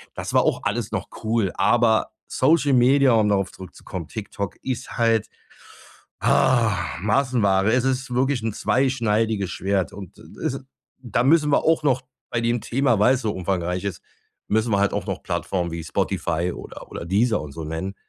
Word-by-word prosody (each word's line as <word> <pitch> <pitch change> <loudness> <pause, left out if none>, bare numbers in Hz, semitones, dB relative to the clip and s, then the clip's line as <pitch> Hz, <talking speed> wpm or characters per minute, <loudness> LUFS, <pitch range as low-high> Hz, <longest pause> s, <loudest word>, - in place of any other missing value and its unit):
Das - - -5
war - - +5
auch - - 0
alles - - -2
noch - - -3 0.2
cool. 110 -4 +1
Aber 110 +2 +3 0.2
Social 145 +1 +2
Media, 130 +1 +5
um 110 -2 +3
darauf 100 -2 +1
zurückzukommen, 90 -2 -9
TikTok, 100 -2 -5
ist 130 -1 -4
halt, 115 -2 +2 0.9
ah, 120 -4 +3 0.3
Massenware. 110 -3 +2
Es 125 0 +2
ist 130 -1 -1
wirklich 130 0 +1
'n 115 - -2
zweischneidiges 110 -6 +1
Schwert 95 -2 -1
und, 95 -3 -10
äh, - - -10
ist, - - 0
äh - - -5 0.4
da 120 -2 -1
müssen 150 +2 +4
wir - - +3
auch 160 0 +3
noch 130 -3 +1 0.3
bei 120 - -1
dem 120 0 0
Thema- 120 -3 +1
weil's 125 +4 +4
so 110 -3 -1
umfangreich 90 0 -2
ist- 100 -5 -4 0.5
müssen 110 +2 +1
wir 100 - +3
halt 100 0 +2
auch - - -2
noch - - -4
Plattformen 90 -3 -2
wie 85 0 -5
Spotify 85 +2 -1
oder - - -10
oder - - -6
Deezer 105 +5 +1
und 75 -2 -8
so 80 +3 -7
nennen, 80 +5 -4
110 Hz, 175 wpm, -23 LUFS, 95-125 Hz, 0.9 s, war